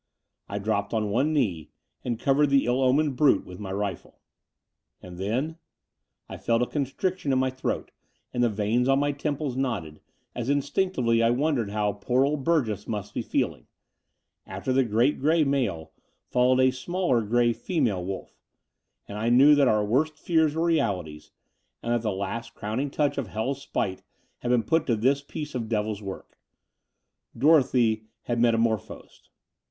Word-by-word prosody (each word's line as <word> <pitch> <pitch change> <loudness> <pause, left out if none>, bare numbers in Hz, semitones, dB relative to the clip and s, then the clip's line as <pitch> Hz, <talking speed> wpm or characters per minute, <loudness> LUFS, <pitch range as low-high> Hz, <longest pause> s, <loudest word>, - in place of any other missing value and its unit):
I 100 - -3
dropped 100 +1 -1
on 105 -2 0
one 135 +8 +2
knee 100 - 0 0.3
and 120 -2 -2
covered 140 +3 +3
the 140 -1 +3
ill 125 +2 +1
omened 135 +2 +2
brute 135 -7 +3
with 90 0 -10
my 100 -2 -6
rifle. 100 -2 -4 0.8
And 90 -1 -11
then... 130 - -2 0.7
I - - -8
felt 115 +1 +1
a - - +1
constriction 145 +4 -2
in 130 - +2
my 130 0 +1
throat, 130 0 -3 0.4
and 125 - 0
the 120 - +4
veins 110 +4 0
on 135 - +4
my 145 +1 +1
temples 145 -2 -3
knotted, 110 - -3 0.3
as 120 +1 -4
instinctively 140 -4 +1
I 115 - +4
wondered 125 -3 +1
how 105 0 0
poor 125 +6 +1
old 145 -1 -1
Burgess 120 - 0
must 105 -2 -4
be - - -2
feeling... - - -2 0.8
after 130 - -3
the 135 +1 +4
great 120 +5 +1
grey 155 +3 +3
male 125 - -1 0.3
followed 130 +1 +3
a 130 0 +5
smaller 130 -1 0
grey 120 +2 +2
female 120 - -1
wolf: 95 +1 -7 0.7
and 100 +1 -6
I 115 +2 0
knew 135 +5 +7
that 145 -2 +4
our 105 -3 +2
worst* 150 +8 +1
fears 160 -3 +1
were 165 +1 +1
realities, 95 - -1 0.5
and 120 - 0
that 120 - +1
the 110 -2 -1
last 115 +4 -5
crowning 115 +7 -3
touch 145 0 0
of 130 - -3
hell's 125 +7 -3
spite 95 -8 -3 0.4
had 120 - -4
been 120 -2 +3
put 160 +7 +1
to 120 - +2
this 135 +6 +2
piece 150 +1 -7
of 115 -4 -4
devil's 105 -2 -1
work. 95 -2 -9 1.0
Dorothy 125 -7 +3 0.2
had 120 -1 -2
metamorphosed. 115 -2 -1
125 Hz, 165 wpm, -26 LUFS, 105-140 Hz, 1.0 s, knew